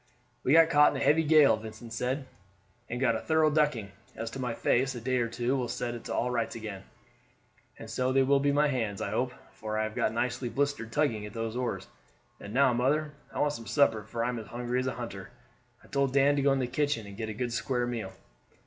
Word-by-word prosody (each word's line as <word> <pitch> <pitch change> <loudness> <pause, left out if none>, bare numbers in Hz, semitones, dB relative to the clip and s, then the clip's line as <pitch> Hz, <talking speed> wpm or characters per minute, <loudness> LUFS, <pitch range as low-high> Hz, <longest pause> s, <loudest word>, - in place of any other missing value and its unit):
"We 135 - +3
got 165 0 +6
caught 150 0 +5
in - - -2
a - - 0
heavy 160 +2 +5
gale," 150 -5 +6
Vincent 110 +1 -9
said, 130 +4 -2 0.6
"and 120 - -3
got 120 -3 +2
a - - -1
thorough 160 +2 +2
ducking. 145 -10 +1 0.2
As 115 +1 -5
to 135 - -7
my 125 -3 -2
face, 130 +2 +1
a - - -4
day 130 +2 0
or 120 -1 +1
two 120 +3 -1
will 125 -2 -1
set 120 0 -3
it 120 - -8
all - - 0
to 125 - -1
rights 115 -2 -1
again; 105 -4 -7 0.9
and 115 - -9
so 125 +4 -1
they 135 0 +4
will 140 +1 +4
my 145 +1 +3
hands, 115 -8 -2
I 100 - -3
hope, 125 +3 0 0.2
for 110 0 -5
I 110 - +1
have 110 0 -3
got - - 0
nicely 125 +2 -2
blistered 140 -4 -1
tugging 115 -7 0
at 105 - -11
those 115 0 -3
oars. 125 -1 -2 0.5
And 100 - -9
now, 130 +1 +4
mother, 150 +5 +1 0.2
I - - -8
want 145 0 +2
some 115 -6 -8
supper, 125 -7 +3
for 115 +2 -3
I 120 - 0
am 120 -2 -3
as 110 - -9
hungry 120 +2 -2
as 130 - -1
a - - -2
hunter. - - -7 0.5
I - - -17
told 140 -1 0
Dan 140 +1 +4
to 140 - +1
go 140 0 +4
into 135 -2 +1
the 120 - -9
kitchen 145 -7 0
and 100 -1 -10
get 110 +1 -4
a - - -3
good 120 +1 -2
square 120 +2 -1
meal." 115 -6 -4
125 Hz, 245 wpm, -29 LUFS, 115-140 Hz, 0.9 s, got